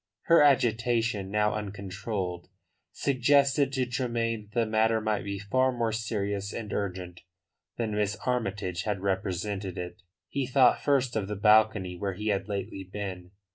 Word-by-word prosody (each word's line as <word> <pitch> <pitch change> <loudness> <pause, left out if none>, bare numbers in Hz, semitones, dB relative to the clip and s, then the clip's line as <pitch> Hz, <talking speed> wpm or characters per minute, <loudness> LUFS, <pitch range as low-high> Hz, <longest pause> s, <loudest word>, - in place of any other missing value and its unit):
Her 170 -1 +6
agitation, 115 -6 +2
now 105 +1 +1
uncontrolled, 100 -3 -4 0.4
suggested 140 +1 +3
to 130 -2 +1
Tremayne 115 -3 -2
that 120 - -1
the - - +1
matter 110 +1 +2
might 110 -1 -1
be 100 0 -4
far 130 +7 +1
more 120 -2 -1
serious 100 -2 -2
and 110 -3 -5
urgent 90 -3 -4 0.6
than 115 -2 -2
Miss 105 -1 0
Armytage 100 -8 -1
had 105 -1 -2
represented 95 0 -2
it. 90 +1 -6 0.3
He 135 -2 -2
thought 130 -1 +4
first 135 -4 +1
of 105 -3 -1
the 105 - -3
balcony 105 -2 +4
where 100 0 -2
he 105 +3 -3
had 100 -1 0
lately 100 -1 -4
been. 95 -2 -6
105 Hz, 150 wpm, -28 LUFS, 95-120 Hz, 0.6 s, Her